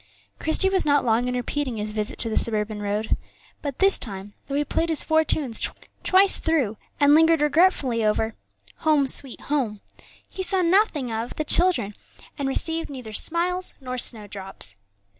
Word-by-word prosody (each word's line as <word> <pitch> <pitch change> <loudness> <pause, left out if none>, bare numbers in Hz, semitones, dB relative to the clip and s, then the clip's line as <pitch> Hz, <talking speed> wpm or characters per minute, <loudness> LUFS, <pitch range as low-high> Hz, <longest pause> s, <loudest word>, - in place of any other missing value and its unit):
Christie 320 +4 +4
was 385 -1 +1
not 285 -3 +2
long 235 +1 +1
in 250 - -2
repeating 250 0 -3
his 210 0 -3
visit 210 -1 -3
to 230 - +2
the 220 - -3
suburban 215 -1 -1
road, 210 +2 -1 0.5
but 285 -3 -5
this 390 0 +4
time, 200 -2 -5
though 275 - -4
he 295 +1 0
played 335 +3 -1
his 320 - +2
four 315 0 +2
tunes 275 -7 -1 0.4
twice 385 +1 +4
through 275 -10 0 0.2
and 290 0 +5
lingered 325 +1 +5
regretfully 295 -6 +2
over 220 +1 0 0.4
"Home, 305 -3 +2
sweet 265 0 +2
Home," 250 -8 -2 0.5
he 380 - -7
saw 370 0 +2
nothing 335 - +1
of 225 +2 -4
the 310 - -3
children, 290 - +3 0.4
and 275 -2 -3
received 325 +4 0
neither 250 -6 -9
smiles 360 - +1
nor 255 -2 -5
snowdrops. 195 - -2
275 Hz, 165 wpm, -23 LUFS, 220-320 Hz, 0.5 s, and